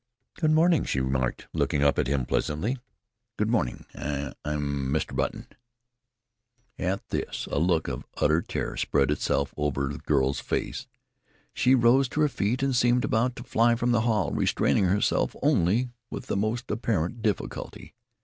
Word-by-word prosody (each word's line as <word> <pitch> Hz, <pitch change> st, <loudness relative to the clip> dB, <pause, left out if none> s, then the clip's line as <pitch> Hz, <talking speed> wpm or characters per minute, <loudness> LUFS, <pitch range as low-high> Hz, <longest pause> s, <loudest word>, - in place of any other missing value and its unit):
"Good 155 Hz, -, 0 dB
morning," 165 Hz, +2 st, +4 dB
she 65 Hz, -, -1 dB
remarked, 65 Hz, -1 st, -1 dB
looking 70 Hz, -, +1 dB
up 70 Hz, -, +3 dB
at -, -, +1 dB
him 70 Hz, -2 st, 0 dB
pleasantly. 105 Hz, -, -1 dB, 0.6 s
"Good 105 Hz, +1 st, 0 dB
morning. 95 Hz, -, -1 dB
I 70 Hz, -2 st, -4 dB
I 75 Hz, -, -2 dB
am 70 Hz, -2 st, -2 dB
Mr. 80 Hz, -, -1 dB
Button." -, -, -2 dB, 1.3 s
At 95 Hz, +2 st, -2 dB
this -, -, -3 dB
a -, -, +1 dB
look 85 Hz, -1 st, +2 dB
of -, -, -5 dB
utter 75 Hz, +3 st, +3 dB
terror -, -, -4 dB
spread 70 Hz, -1 st, +1 dB
itself 75 Hz, -, 0 dB
over 70 Hz, -2 st, -1 dB
the 70 Hz, -, -6 dB
girl's 70 Hz, -1 st, +1 dB
face. -, -, -3 dB, 0.7 s
She 130 Hz, +2 st, +4 dB
rose 125 Hz, +2 st, +4 dB
to 155 Hz, -, -1 dB
her 150 Hz, -, +4 dB
feet 125 Hz, +2 st, -1 dB
and 135 Hz, -2 st, +1 dB
seemed 120 Hz, 0 st, +3 dB
about 120 Hz, +3 st, +1 dB
to 120 Hz, -, -8 dB
fly 120 Hz, -1 st, +3 dB
from 120 Hz, +1 st, 0 dB
the 115 Hz, -2 st, +3 dB
hall, 110 Hz, -4 st, +1 dB
restraining 95 Hz, -, +2 dB
herself 100 Hz, +3 st, +1 dB
only 115 Hz, +9 st, +2 dB, 0.2 s
with -, -, -6 dB
the -, -, -2 dB
most 110 Hz, +5 st, -1 dB
apparent 110 Hz, -1 st, -1 dB
difficulty. 105 Hz, -2 st, -3 dB
100 Hz, 165 wpm, -27 LUFS, 75-120 Hz, 1.3 s, morning